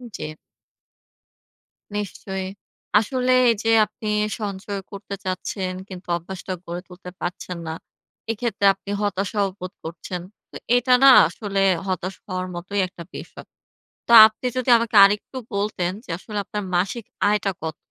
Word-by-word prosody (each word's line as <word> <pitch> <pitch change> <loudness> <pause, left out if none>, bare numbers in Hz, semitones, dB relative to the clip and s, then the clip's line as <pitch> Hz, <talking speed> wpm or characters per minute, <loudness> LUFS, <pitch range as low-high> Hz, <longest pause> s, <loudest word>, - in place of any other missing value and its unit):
জি। 155 - -5 1.7
নিশ্চয়ই। 190 -2 -4 0.5
আসলে 255 +3 0 0.2
এইযে 225 +1 -1 0.2
আপনি 215 +1 -9 0.3
সঞ্চয় 200 0 -4
করতে 200 0 -6
চাচ্ছেন 185 0 -3 0.2
কিন্তু 185 -1 -9
অভ্যাসটা 185 +2 -6
গড়ে 175 +1 -5
তুলতে 180 0 -11
পারছেন 175 0 -5
না। 160 - -3 0.6
এক্ষেত্রে 225 -2 -2
আপনি 195 +1 -14
হতাশাও 200 0 0
বোধ 185 +1 -6
করছেন। 170 +2 -6 0.3
তো - - -14 0.2
এটা 250 +1 +3
না 270 - +10 0.2
আসলে 195 +2 -3 0.3
হতাশ 185 0 -2
হওয়ার 185 0 -3
মতোই 195 +4 -3
একটা 180 -2 -11
বিষ - - -8 0.8
তা 235 - +6
আপনি 220 +3 -7
যদি 255 0 0
আমাকে 230 -2 -1
আরেকটু 205 +6 +1 0.2
বলতেন 200 -3 -1
যে - - -12
আসলে 210 +1 -6
আপনার 210 -1 -4
মাসিক 195 +5 0 0.2
আয়টা 205 -1 +1
কত? 160 -1 -4
195 Hz, 135 wpm, -23 LUFS, 185-210 Hz, 1.7 s, না